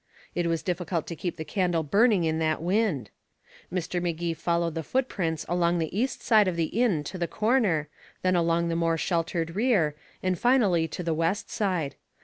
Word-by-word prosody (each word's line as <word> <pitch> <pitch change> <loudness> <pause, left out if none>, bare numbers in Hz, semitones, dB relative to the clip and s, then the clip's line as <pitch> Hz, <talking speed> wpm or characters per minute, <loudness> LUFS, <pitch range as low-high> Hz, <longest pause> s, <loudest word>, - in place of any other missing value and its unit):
It 175 -1 0
was 165 -1 -1
difficult 175 -3 -2
to 170 - -6
keep 175 +1 -4
the 160 - -5
candle 175 -4 0
burning 205 - +3
in 160 0 0
that 155 -1 +1
wind. 175 - 0 0.6
Mr. 180 0 -2
Magee 170 -1 -1
followed 170 0 0
the 165 - -3
footprints 175 - -1
along 175 0 +2
the 165 +1 -2
east 245 +5 -1
side 215 -3 +5
of 180 - 0
the 165 -2 -1
inn 190 -12 +2
to 185 +5 -6
the 170 - 0
corner, 210 - +1 0.4
then 185 0 +3
along 170 0 +2
the 165 - 0
more 165 -1 +1
sheltered 165 0 -1
rear, 200 - +2 0.3
and 185 -1 0
finally 205 -10 +3
to 180 - -5
the 165 -1 0
west 165 +6 -1
side. 180 -9 -1
170 Hz, 185 wpm, -27 LUFS, 165-190 Hz, 0.6 s, side